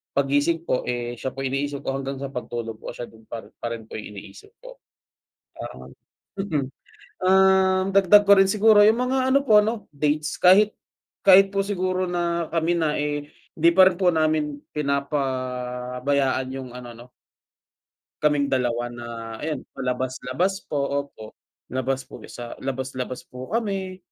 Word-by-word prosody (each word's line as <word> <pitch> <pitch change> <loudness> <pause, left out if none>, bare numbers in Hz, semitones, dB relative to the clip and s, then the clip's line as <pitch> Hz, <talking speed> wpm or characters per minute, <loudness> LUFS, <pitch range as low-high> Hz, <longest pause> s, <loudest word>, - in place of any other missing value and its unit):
paggising 145 +4 +1
po, - - +1
eh, 120 -1 -2
siya 130 - -4
po 135 - -5
yung 130 - -2
iniisip 140 0 -3
ko 135 - -1
hanggang 135 0 -4
sa 140 0 -5
pagtulog 120 -3 -5
po - - -7
siya 120 - -6
din 110 0 -18
pa 115 - -7 0.2
pa 120 - -3
rin 115 -1 -8
po - - -9
iniisip 105 - -11
ko. - - -12 0.8
Para - - -7
ngang - - -13 0.4
mhm. 155 -9 -1 0.6
Ah, 190 0 +4
dagdag 195 +1 +6
ko 200 - +7
rin 195 - +6
siguro 215 +1 +5
'yung 220 +2 +5
mga 260 +1 +1
ano 275 - +5
po 215 -3 +7
'no, 220 0 -3
dates 150 +2 -1
kahit 205 +4 +6 0.5
kahit 195 0 +7
po 195 - +2
siguro 185 -2 -1
na 170 -2 -1
kami 165 0 +1
na, 160 -3 +1
eh, 145 0 -3 0.3
hindi 165 +2 +5
pa 190 -1 +8
rin 185 - -5
po 180 -2 +5
namin 155 -2 0 0.2
pinapabayaan 130 -2 -1
'yung 130 -1 -7
ano, 125 -1 -9
'no 120 +2 -14 1.1
kaming 145 -2 +3
dalawa 120 -3 0
na 120 0 -8 0.4
ayan, 150 -3 -4
labas-labas 130 +8 -2
po. 145 - -1
Opo. 140 -5 -4 0.4
Labas 130 +1 -2
po - - -12
sa 120 -1 -8
labas-labas 130 -1 -4
po 125 +1 -10
kami, 195 -5 -2
145 Hz, 160 wpm, -24 LUFS, 130-185 Hz, 1.1 s, pa